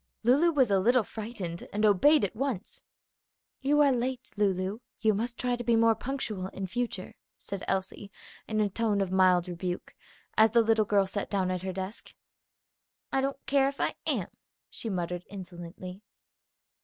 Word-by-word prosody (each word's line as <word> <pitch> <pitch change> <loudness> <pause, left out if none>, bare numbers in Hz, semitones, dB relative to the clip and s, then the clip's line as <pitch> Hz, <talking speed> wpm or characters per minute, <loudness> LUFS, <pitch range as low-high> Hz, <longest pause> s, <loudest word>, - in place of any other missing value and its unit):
Lulu 280 +9 +5
was 265 -8 +3
a 195 - +4
little 240 +4 +4
frightened, 210 -7 -6
and 210 +1 +1
obeyed 255 - +5
at 195 - -6
once. 240 -5 -3 0.8
"You 290 +2 +3
are 285 -2 +5
late, 255 0 -2
Lulu. 195 0 0 0.2
You 220 -1 +3
must 235 +4 -2
try 245 -1 0
to 240 - -5
be 235 -1 +3
more 225 0 +5
punctual 220 -7 -3
in 195 0 -5
future," 195 -1 -3 0.5
Elsie 195 +1 -2 0.4
said 215 - -4
in 215 - +3
a 210 - +3
tone 215 -1 +1
of 190 -2 -1
mild 185 -1 +4
rebuke, 180 0 -4 0.4
as 220 0 +5
the 235 -1 +6
little 220 -1 +3
girl 200 -1 +3
sat 195 +1 -4
down 190 -2 0
at 180 -1 -2
her 190 0 -3
desk. 190 +3 -7 1.0
"I 270 - +2
don't 275 0 -3
care 275 -1 +3
if 280 - -10
I - - +1
am," - - 0 0.4
she 225 - -5
muttered, 180 -2 -2
insolently. 180 0 -8
210 Hz, 170 wpm, -29 LUFS, 185-245 Hz, 1.0 s, the